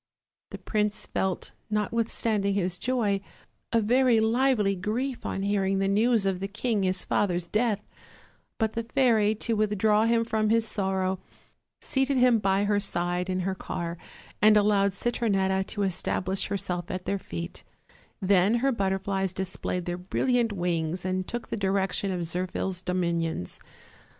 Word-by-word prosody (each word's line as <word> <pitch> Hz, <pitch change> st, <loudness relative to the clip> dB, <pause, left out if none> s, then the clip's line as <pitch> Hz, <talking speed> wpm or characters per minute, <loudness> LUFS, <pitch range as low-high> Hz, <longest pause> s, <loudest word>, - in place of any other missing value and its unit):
The -, -, -7 dB
prince 210 Hz, -1 st, -1 dB
felt, 190 Hz, -1 st, -2 dB, 0.2 s
notwithstanding 210 Hz, -1 st, 0 dB
his 180 Hz, -2 st, -1 dB
joy, 220 Hz, -6 st, 0 dB, 0.5 s
a 230 Hz, -, +3 dB
very 240 Hz, +2 st, +4 dB
lively 220 Hz, -3 st, +2 dB
grief 235 Hz, +8 st, -3 dB
on 195 Hz, -, -3 dB
hearing 195 Hz, -1 st, +1 dB
the 195 Hz, 0 st, +1 dB
news 215 Hz, +2 st, +3 dB
of 190 Hz, -2 st, 0 dB
the 195 Hz, -, -3 dB
king 220 Hz, +1 st, -1 dB
his 185 Hz, -1 st, -1 dB
father's 180 Hz, -4 st, +1 dB
death; 215 Hz, 0 st, 0 dB, 0.7 s
but 220 Hz, -1 st, 0 dB
the 230 Hz, -, -1 dB
fairy, 225 Hz, -3 st, +2 dB
to 230 Hz, +2 st, -1 dB
withdraw 210 Hz, 0 st, +2 dB
him 230 Hz, 0 st, +2 dB
from 220 Hz, -1 st, 0 dB
his 225 Hz, 0 st, +3 dB
sorrow, 190 Hz, -2 st, -1 dB, 0.6 s
seated 270 Hz, 0 st, +1 dB
him 250 Hz, -2 st, +5 dB
by 195 Hz, 0 st, +2 dB
her 205 Hz, 0 st, +2 dB
side 180 Hz, -2 st, -1 dB
in 185 Hz, 0 st, 0 dB
her 190 Hz, +1 st, -1 dB
car, 170 Hz, -2 st, -4 dB, 0.5 s
and 215 Hz, 0 st, +7 dB
allowed 200 Hz, -1 st, +3 dB
Citronetta 195 Hz, -4 st, +1 dB
to 205 Hz, -, -2 dB
establish 190 Hz, 0 st, 0 dB
herself 185 Hz, -3 st, -3 dB
at 185 Hz, 0 st, -4 dB
their 200 Hz, -, -1 dB
feet; 85 Hz, -, -7 dB, 0.6 s
then 195 Hz, +2 st, +3 dB
her 265 Hz, +3 st, +2 dB
butterflies 195 Hz, -3 st, -1 dB
displayed 185 Hz, -1 st, -3 dB
their 175 Hz, 0 st, -3 dB
brilliant 235 Hz, +5 st, +1 dB
wings 175 Hz, -2 st, -2 dB
and 185 Hz, 0 st, -1 dB
took 240 Hz, 0 st, -5 dB
the -, -, -2 dB
direction 195 Hz, 0 st, 0 dB
of 180 Hz, -1 st, -2 dB
Zirphil's 185 Hz, +1 st, -2 dB
domin 180 Hz, -2 st, 0 dB
ions. 160 Hz, -, -4 dB
200 Hz, 150 wpm, -27 LUFS, 185-220 Hz, 0.7 s, and